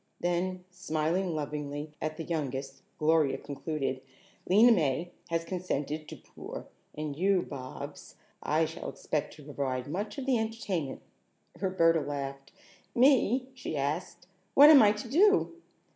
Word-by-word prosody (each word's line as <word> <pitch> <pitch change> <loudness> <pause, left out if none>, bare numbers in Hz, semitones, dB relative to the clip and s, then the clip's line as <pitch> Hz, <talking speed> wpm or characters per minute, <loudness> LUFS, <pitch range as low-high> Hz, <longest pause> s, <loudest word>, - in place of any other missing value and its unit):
Then, 180 +1 -1
smiling 175 0 -1
lovingly 150 0 -4
at 155 0 -3
the 165 - -4
youngest, 135 -4 -4 0.2
Gloria 155 -2 +3
concluded: 140 -2 -3 0.5
"Lena 220 +6 +7
May 165 - +1 0.2
has 165 0 0
consented 155 -4 -3
to - - -7
pour, - - -9 0.3
and 150 -1 -4
you, 185 +3 +2
Bobs, 130 -2 -8 0.3
I 160 +2 +2
shall 160 +1 -6
expect 150 -2 -3
to 150 - -14
provide 135 -3 -3
much 200 - -4
of 270 - -4
the 260 -4 +2
entertainment." 205 -10 -3 0.6
Roberta 165 -4 +3
laughed. 140 -1 -5 0.4
"Me?" 255 0 +4
she 250 - -5
asked. 150 +6 -3 0.3
"What 290 +2 +10
am 290 - +9
I 210 -2 +6
to 210 +2 -7
do?" 390 - +4
160 Hz, 135 wpm, -30 LUFS, 145-195 Hz, 0.6 s, What